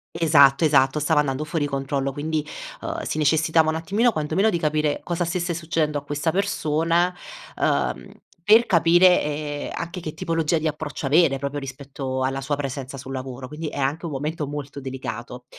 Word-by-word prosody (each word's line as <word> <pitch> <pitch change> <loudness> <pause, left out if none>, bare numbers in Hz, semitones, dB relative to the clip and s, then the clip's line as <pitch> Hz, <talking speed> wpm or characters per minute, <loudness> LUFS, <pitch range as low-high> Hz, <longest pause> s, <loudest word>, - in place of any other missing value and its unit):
Esatto, 150 -2 +5
esatto, 140 0 +3
stava 150 0 +3
andando 140 +1 -2
fuori 150 -1 -1
controllo, 135 0 -2
quindi, 150 +2 -2 0.4
uhm, - - -4
si - - -3
necessitava 160 +1 +3
un 160 - 0
attimino, 200 +9 +1
quanto 155 -6 -3
meno 210 +3 +4
di 170 -4 0
capire 150 -1 0
cosa 175 0 -1
stesse 175 0 -1
succedendo 160 -2 -1
a 145 - -5
questa 145 +3 -1
persona, 170 -2 +1 0.4
uhm, - - -1 0.3
per 220 +5 +6
capire, 175 +1 +5
ehm, 145 -1 -3
anche 170 +1 -5
che 155 - -5
tipologia 165 0 0
di 155 0 -1
approccio 150 -1 -4
avere, 145 -1 +4
proprio 140 +1 -3
rispetto 135 -1 -5
alla 135 +1 -1
sua 140 +1 -2
presenza 135 -1 -5
sul 135 0 -7
lavoro, 130 -1 -6
quindi 150 +3 -6
è - - -8
anche 145 +5 -1
un 160 - -4
momento 150 +2 -3
molto 145 -1 -6
delicato, 125 -2 -6
150 Hz, 175 wpm, -23 LUFS, 140-165 Hz, 0.4 s, per